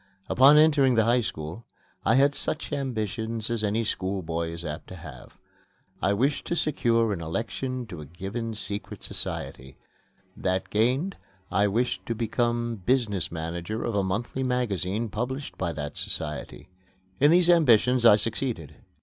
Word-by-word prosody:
Upon 140 +4 +7
entering 145 -5 +5
the 110 - +4
High 120 +2 +3
School 85 0 -5 0.4
I 115 - +4
had 140 +2 +5
such 155 +2 -3
ambitions 115 -3 -2
as 115 -2 0
any 105 +2 +1
schoolboy 90 -5 -2
is 85 +1 -7
apt 75 +1 -5
to 95 - -9
have. 75 -7 -11 0.6
I 100 - +2
wished 135 +8 +1
to 170 - 0
secure 115 -8 +2
an 85 - -5
election 120 +9 -3
to 90 -7 -8
a 75 - -9
given 105 - -5
secret 105 -1 -5
society; 65 +1 -5 0.6
that 95 0 -1
gained, 130 - +1 0.3
I 105 +1 +3
wished 120 +5 0
to 115 - -1
become 120 +1 -1
business 110 - +1
manager 85 +6 -4
of 115 - -2
a 100 - +2
monthly 110 +7 -2
magazine 115 -4 -1
published 130 +6 -4
by 90 -2 0
that 75 -1 -5
society. - - -4 0.5
In 145 - +6
these 175 +1 +5
ambitions 125 -6 +4
I 115 -3 +9
succeeded. 110 - -3
110 Hz, 150 wpm, -26 LUFS, 95-125 Hz, 0.6 s, I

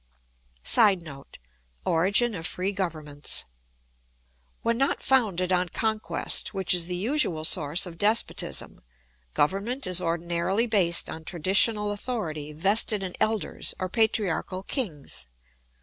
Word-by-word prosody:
[Sidenote: 175 - +1 0.5
Origin 200 +8 +2
of 165 -3 -3
free 185 +2 -2
governments.] 155 -7 -2 1.2
When 230 0 +1
not 275 - 0
founded 195 -9 +2
on 180 -1 +1
conquest, 220 +1 +1
which 190 -2 +2
is 175 -2 +1
the 180 - -3
usual 185 - 0
source 155 +4 +3
of 170 -2 -10
despotism, 215 +3 0 0.5
government 205 - 0
is 185 -1 +2
ordinarily 170 +5 -1
based 190 -7 +3
on 160 - -7
traditional 200 +5 +1
authority 180 -9 -4
vested 195 +5 +2
in 185 -1 -5
elders 215 -1 -1
or 185 - -4
patriarchal 195 -3 0
kings. 150 - -4
185 Hz, 115 wpm, -26 LUFS, 165-215 Hz, 1.2 s, source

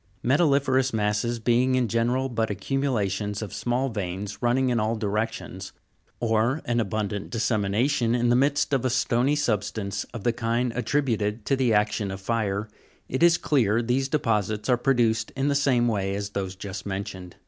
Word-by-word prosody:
22. - - -4 0.2
Metalli'ferous 135 -3 +2
masses 105 +3 0
being 120 +3 +2
in 125 -2 +2
general 120 +4 +1
but 115 -3 -1
accumulations 105 -2 -1
of 100 -3 -7
small 120 +4 -1
veins 100 -2 -5
running 125 +2 +2
in 120 -2 +1
all 110 +2 0
directions 105 -3 -3 0.5
(fig. 120 - -1
286), - - -2 0.4
or - - -1
an 120 - +2
abundant 105 -1 -2
dissemination 115 +2 +1
in 120 0 +1
the 120 - +4
midst 140 +2 +2
of 135 - +2
a 130 - +1
stony 125 +3 +1
substance 105 -6 -1
of 115 -5 -9
the 120 - +2
kind 115 +1 -1
attri 135 +4 0
Metalli'ferous - - -8
b 130 - 0
ute( 110 - 0
J 105 0 +1
to 135 - +2
t 130 - +1
^ - - +3
e 115 - +3
act 105 +1 +1
i - - 0
on 100 - -3
o - - -4
f - - -10
fl 100 +4 -2
re> 105 -3 0
^ 110 - -15 0.5
j 170 - +6
s 170 0 +3
clear 115 -6 +2
these 130 +3 0
deposits 110 -7 0
are 125 - +4
produced 120 -3 +1
in 135 +2 0
the - - +2
same 130 -4 +2
way 100 -3 -1
as 100 0 -3
those 95 -2 -3
just 95 0 -6
mentioned. 95 -2 -5
115 Hz, 215 wpm, -25 LUFS, 105-125 Hz, 0.5 s, j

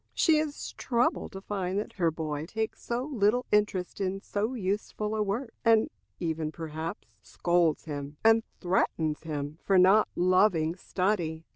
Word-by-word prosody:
She 315 -2 +4
is 305 -1 -4
troubled 240 -3 0
to 195 - -7
find 195 -2 -2
that 210 - -3
her 170 -4 +2
boy 155 -1 -4
takes 220 +3 -3
so 240 +1 -2
little 245 -3 +1
interest 205 -3 +1
in 195 0 -1
so 210 +5 -2
useful 210 +1 -2
a 215 - 0
work, 225 +4 -2
and 225 -1 +4 0.3
even, 160 -2 -2
perhaps, 160 +1 -6
scolds 170 -3 +1
him, 145 -1 -6
and 225 0 +6 0.2
threatens 165 -4 0
him 150 -1 -5
for 195 - +3
not 190 +4 +6
loving 180 -3 +3
study. 180 -4 -1
190 Hz, 150 wpm, -29 LUFS, 160-215 Hz, 0.3 s, and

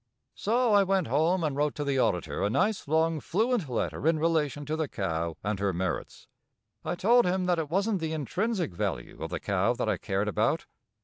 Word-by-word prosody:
So 235 +1 +1
I 205 - +7
went 195 -2 +1
home 165 +5 +2
and 150 -3 0
wrote 150 +1 0
to 145 - -2
the 140 -2 0
auditor 85 - 0
a 100 - +2
nice, 205 - 0
long, 160 +1 +2
fluent 215 - 0
letter 125 +4 -2
in 165 -1 +4
relation 150 -3 0
to 155 - -2
the 160 -1 -1
cow 85 - -3
and 105 0 -1
her 100 -1 0
merits. 90 -1 -4 0.6
I - - -2
told 230 +5 +4
him 185 +1 0
that 175 -2 +2
it 155 -3 -3
wasn't 195 +4 +1
the 160 -1 -2
intrinsic 175 - -1
value - - -4
of - - -3
the - - -3
cow - - +1
that - - -2
I - - +1
cared 100 +2 -1
about. 105 - +1
160 Hz, 205 wpm, -28 LUFS, 115-190 Hz, 0.6 s, I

